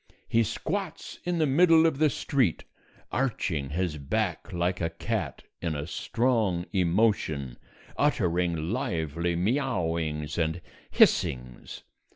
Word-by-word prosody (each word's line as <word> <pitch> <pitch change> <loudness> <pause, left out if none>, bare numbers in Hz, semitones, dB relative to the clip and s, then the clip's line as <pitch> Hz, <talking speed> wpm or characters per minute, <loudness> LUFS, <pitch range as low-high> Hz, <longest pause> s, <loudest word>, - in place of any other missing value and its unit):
He 115 - +3
squats 175 - -3
in 175 -1 0
the 160 - +3
middle 165 +3 +5
of 160 -4 +1
the 155 -1 +5
street, 135 - 0 0.5
arching 95 - -1
his 80 0 -2
back 95 +5 -2
like 90 0 -1
a 85 - 0
cat 85 - -3 0.2
in 80 -3 -2
a 70 0 -3
strong 110 -2 0
emotion, 85 - +1 0.4
uttering 90 - +2 0.2
lively 85 - -1
miaowings 85 - -1
and 80 +1 0 0.3
hissings. 60 -1 +1
90 Hz, 115 wpm, -28 LUFS, 80-130 Hz, 0.5 s, middle